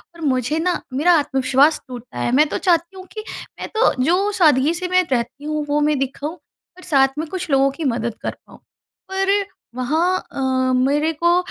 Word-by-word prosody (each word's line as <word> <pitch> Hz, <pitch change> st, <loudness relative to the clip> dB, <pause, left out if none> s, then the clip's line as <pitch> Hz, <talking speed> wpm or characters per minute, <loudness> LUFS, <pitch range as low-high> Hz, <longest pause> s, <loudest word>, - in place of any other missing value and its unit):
और 335 Hz, -, -13 dB
मुझे 270 Hz, +1 st, 0 dB
ना 355 Hz, +2 st, 0 dB
मेरा 320 Hz, +7 st, +4 dB
आत्मविश्वास 270 Hz, +2 st, +2 dB
टूटता 245 Hz, -, -9 dB
है। 120 Hz, -, 0 dB
मैं 300 Hz, +2 st, +5 dB
तो -, -, -2 dB
चाहती 345 Hz, +1 st, +1 dB
हूँ 370 Hz, -, -9 dB
कि 430 Hz, -1 st, -6 dB, 0.4 s
मैं -, -, -4 dB
तो 460 Hz, -, +4 dB
जो 375 Hz, +7 st, +2 dB
सादगी 305 Hz, -4 st, +3 dB
से 360 Hz, +1 st, -4 dB
मैं 365 Hz, 0 st, +3 dB
रहती 245 Hz, +3 st, -2 dB
हूँ, 305 Hz, 0 st, -2 dB
वो 295 Hz, +1 st, +2 dB
मैं 300 Hz, -1 st, +2 dB
दिखाऊँ 275 Hz, +3 st, -3 dB
और 365 Hz, 0 st, -22 dB
साथ 270 Hz, -3 st, +2 dB
में 320 Hz, -, -3 dB
कुछ 375 Hz, -3 st, -5 dB
लोगों 275 Hz, 0 st, +4 dB
की 320 Hz, +4 st, -7 dB
मदद 235 Hz, -1 st, -3 dB
कर -, -, -2 dB, 0.2 s
पाऊँ। -, -, -16 dB, 0.5 s
पर 390 Hz, +1 st, +1 dB, 0.4 s
वहाँ 320 Hz, +9 st, +1 dB
अ, 260 Hz, -1 st, 0 dB
मेरे 290 Hz, +5 st, +1 dB
को 345 Hz, +1 st, +5 dB
300 Hz, 195 wpm, -20 LUFS, 265-350 Hz, 0.5 s, मैं